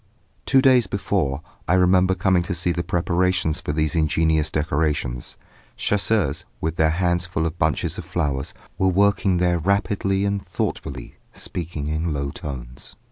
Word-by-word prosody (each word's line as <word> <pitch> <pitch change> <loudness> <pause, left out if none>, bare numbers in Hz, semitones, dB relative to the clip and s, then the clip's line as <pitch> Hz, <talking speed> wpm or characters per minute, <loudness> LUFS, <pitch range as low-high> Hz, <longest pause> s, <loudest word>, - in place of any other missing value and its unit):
Two 135 -1 +4
days 125 -5 +5
before, 85 -8 -1 0.2
I 90 - +3
remember 95 0 +4
coming 95 0 +2
to 90 - 0
see 85 +1 0
the 85 0 -1
preparations 90 -1 0
for - - -3
these 75 0 0
ingenious 80 -1 +2
decorations. 75 -5 -1 0.4
Chasseurs, 100 -7 0 0.2
with 80 +1 -2
their 80 0 +4
hands 85 +1 +1
full 80 -2 -1
of 80 +2 -4
bunches 80 -2 0
of - - -5
flowers, 70 -5 -2 0.2
were 95 - +3
working 100 0 +3
there 90 -1 +2
rapidly 100 +2 +1
and 100 -1 -1
thoughtfully, - - -4 0.2
speaking 85 -4 -5
in 80 +1 -1
low 70 -1 -2
tones. 65 -4 -7
85 Hz, 150 wpm, -23 LUFS, 75-95 Hz, 0.4 s, days